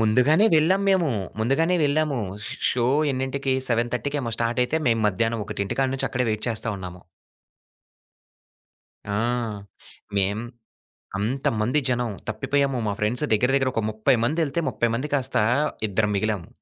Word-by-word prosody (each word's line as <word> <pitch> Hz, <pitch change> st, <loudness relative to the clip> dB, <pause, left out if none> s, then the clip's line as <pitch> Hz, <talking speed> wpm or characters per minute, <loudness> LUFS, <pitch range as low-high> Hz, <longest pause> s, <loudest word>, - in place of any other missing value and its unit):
ముందుగానే 125 Hz, -, +4 dB
వెళ్ళాము 185 Hz, +6 st, +3 dB
మేము, 175 Hz, -7 st, +3 dB, 0.3 s
ముందుగానే 160 Hz, +10 st, +2 dB
వెళ్ళాము. 145 Hz, -1 st, +1 dB, 0.3 s
షో -, -, -6 dB, 0.2 s
షో 120 Hz, -2 st, +1 dB, 0.2 s
ఎన్నింటికి‌ 130 Hz, +1 st, -1 dB
సెవెన్ 120 Hz, +1 st, 0 dB
థర్టీ‌కేమో 140 Hz, -2 st, -2 dB
స్టార్టైయితే, 125 Hz, +6 st, +1 dB
మేము 115 Hz, -1 st, +2 dB
మధ్యాహ్నం 115 Hz, +3 st, -1 dB
ఒకటింటి 100 Hz, -1 st, -3 dB
కాడ 135 Hz, -, +2 dB
నుంచి 135 Hz, -, -1 dB
అక్కడే 125 Hz, -1 st, 0 dB
వైట్ 110 Hz, 0 st, -2 dB
చేస్తా 115 Hz, 0 st, -2 dB
ఉన్నాము. 90 Hz, -1 st, -8 dB, 2.1 s
ఆ! -, -, -1 dB, 1.0 s
మేం 100 Hz, +2 st, +1 dB, 0.8 s
అంతమంది 115 Hz, +2 st, 0 dB
జనం. 125 Hz, -2 st, 0 dB, 0.2 s
తప్పిపోయాము 135 Hz, +4 st, 0 dB
మా 100 Hz, -, 0 dB
ఫ్రెండ్స్ 115 Hz, +7 st, +1 dB
దగ్గర, 115 Hz, +4 st, +3 dB
దగ్గర 130 Hz, -1 st, +2 dB
ఒక 115 Hz, -, 0 dB
30 110 Hz, +3 st, +2 dB
మందెళ్తే, 160 Hz, +3 st, 0 dB
30 120 Hz, -, 0 dB
మంది 140 Hz, +5 st, -4 dB
కాస్త 135 Hz, -3 st, -1 dB, 0.5 s
ఇద్దరం 105 Hz, +1 st, +1 dB
మిగిలాము. 105 Hz, -4 st, -1 dB
125 Hz, 135 wpm, -24 LUFS, 110-140 Hz, 2.1 s, ముందుగానే